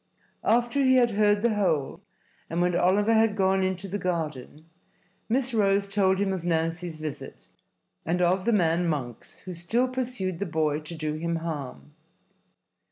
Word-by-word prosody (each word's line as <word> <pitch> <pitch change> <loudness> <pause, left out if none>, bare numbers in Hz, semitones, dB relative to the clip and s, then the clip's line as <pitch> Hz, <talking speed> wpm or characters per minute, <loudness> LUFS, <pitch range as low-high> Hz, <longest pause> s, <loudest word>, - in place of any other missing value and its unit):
After 240 +4 +2
he 260 0 +5
had 240 -2 +4
heard 205 0 +2
the 235 -2 +3
whole, 170 -9 0 0.5
and 165 - -2
when 175 0 +1
Oliver 205 +6 +3
had 220 -1 +3
gone 190 -1 +2
into 185 +1 -2
the 200 +2 -4
garden, 155 -5 -4 0.6
Miss 255 +2 0
Rose 200 -2 +2
told 195 -1 +2
him 195 0 0
of 185 -3 -4
Nancy's 165 0 -1
visit 155 -2 -7 0.6
and 175 +2 -1
of 180 +1 +2
the 235 - +3
man 175 -4 +2
Monks 130 -7 -4
who 185 - -7
still 220 +9 0
pursued 245 -9 -3
the 200 - -2
boy 155 -2 0
to 155 +2 -8
do 155 -1 -3
him 170 +2 -2
harm. 145 - -6
185 Hz, 165 wpm, -26 LUFS, 165-205 Hz, 0.6 s, he